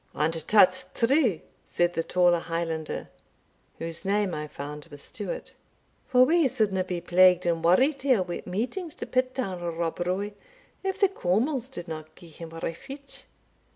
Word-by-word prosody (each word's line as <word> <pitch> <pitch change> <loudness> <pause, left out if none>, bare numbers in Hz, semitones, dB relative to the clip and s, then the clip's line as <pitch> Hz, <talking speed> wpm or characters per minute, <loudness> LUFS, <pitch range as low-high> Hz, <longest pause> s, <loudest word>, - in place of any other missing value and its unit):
"And 155 +2 +1
tat's 200 -3 +5
true," 240 - +2 0.2
said 175 0 0
the 165 - 0
taller 175 0 +3
Highlander 165 -1 -3 0.7
whose 165 +1 -6
name 200 -1 +1
I 150 0 -4
found 150 +1 -7
was 145 -3 -12
Stewart - - -6 0.5
"for 255 -1 +6
we 330 0 +4
suldna 215 -7 +1
be 180 -1 -3
plagued 180 +1 +5
and 165 -1 0
worried 260 - +4
here 255 -8 +3
wi' 175 -1 -5
meetings 255 - -3
to - - -6
pit 255 0 0
down 190 -9 -3 0.2
Rob 165 0 -2
Roy, 185 +4 -1 0.5
if 385 0 -2
the 395 - +6
Cawmils 250 - 0
didna 165 -11 -6
gie 170 - -14
him 165 +1 -9
refutch. 270 - -7
185 Hz, 155 wpm, -27 LUFS, 165-255 Hz, 0.7 s, for